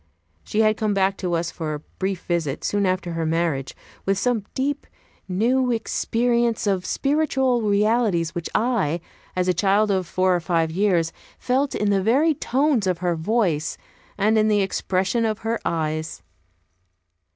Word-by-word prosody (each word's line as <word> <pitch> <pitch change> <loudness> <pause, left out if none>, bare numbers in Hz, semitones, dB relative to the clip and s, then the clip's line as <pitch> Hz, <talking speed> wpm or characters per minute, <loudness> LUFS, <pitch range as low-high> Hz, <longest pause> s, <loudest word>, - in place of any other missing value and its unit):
She 215 - 0
had 215 -1 +3
come 215 -2 0
back 195 0 +2
to 175 -2 -1
us 165 0 -1
for 155 -3 -4
a - - -6 0.2
brief 190 -1 -2
visit, 165 -6 -2
soon 205 -1 +1
after 185 -1 -1
her 165 0 -2
marriage, 160 -4 -1 0.3
with 195 0 +1
some 230 -1 0
deep, 285 +2 -2 0.4
new 245 +7 +1
experience 235 0 0
of 190 -3 0
spiritual 270 -4 +1
realities 210 -5 +1
which 170 -1 -4
I, 210 -10 +1 0.4
a 180 0 +2
child 200 +4 +2
of 185 -2 0
four 185 0 +2
or - - +1
five 165 -2 0
years, 175 -3 +1 0.2
felt 265 +3 0
in 210 -1 +1
the 195 -1 +2
very 275 +11 +3
tones 270 -5 +1
of 180 -2 +1
her 175 0 0
voice, 165 -4 0 0.4
and 215 +2 +3
in 215 - +3
the 210 -1 +3
expression 190 +3 0
of 215 -2 0
her 230 +1 0
eyes. 155 -1 -2
195 Hz, 160 wpm, -23 LUFS, 175-230 Hz, 0.4 s, had